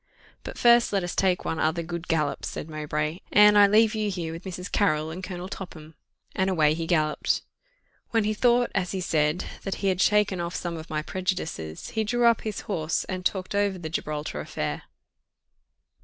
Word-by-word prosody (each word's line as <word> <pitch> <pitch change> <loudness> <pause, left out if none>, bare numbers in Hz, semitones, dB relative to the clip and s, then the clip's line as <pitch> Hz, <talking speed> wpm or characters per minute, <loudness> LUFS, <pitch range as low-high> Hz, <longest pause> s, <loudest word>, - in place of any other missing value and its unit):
"But - - -7
first 235 0 +5
let 195 -2 +1
us 175 - -3
take 185 -2 +1
one 160 - -2
other 160 +2 +1
good 170 +1 -6
gallop," 155 -4 0
said - - -5
Mowbray; 150 +1 -3
"Anne, 210 0 +7
I 205 -1 +8
leave 215 +2 +4
you 215 -1 -1
here 170 -4 -4
with 165 +3 -9
Mrs. 180 0 -6
Carrill 155 -6 +1
and 180 +3 -7
Colonel 180 0 -5
Topham;" 165 -5 -9 0.4
and 190 0 +1
away 155 -5 +3
he 165 +1 -3
galloped. 155 -3 +1 0.7
When 225 -2 +2
he 215 +1 0
thought, 240 +2 +3
as 180 +1 -1
he 190 - -2
said, 155 -1 +1 0.2
that 195 - -3
he 195 - 0
had 185 0 0
shaken 210 -2 +3
off 170 +1 -4
some 170 -1 -3
of 160 +1 -8
my 155 -1 -2
prejudices, 160 - -4
he 220 - 0
drew 240 +3 +1
up 230 -2 +4
his 215 -3 -4
horse, 165 -6 -1
and 185 -1 -5
talked 185 +1 -1
over 200 -1 +1
the 165 -3 -6
Gibraltar 150 -1 -3
affair. 75 0 -4
180 Hz, 195 wpm, -26 LUFS, 160-205 Hz, 0.7 s, I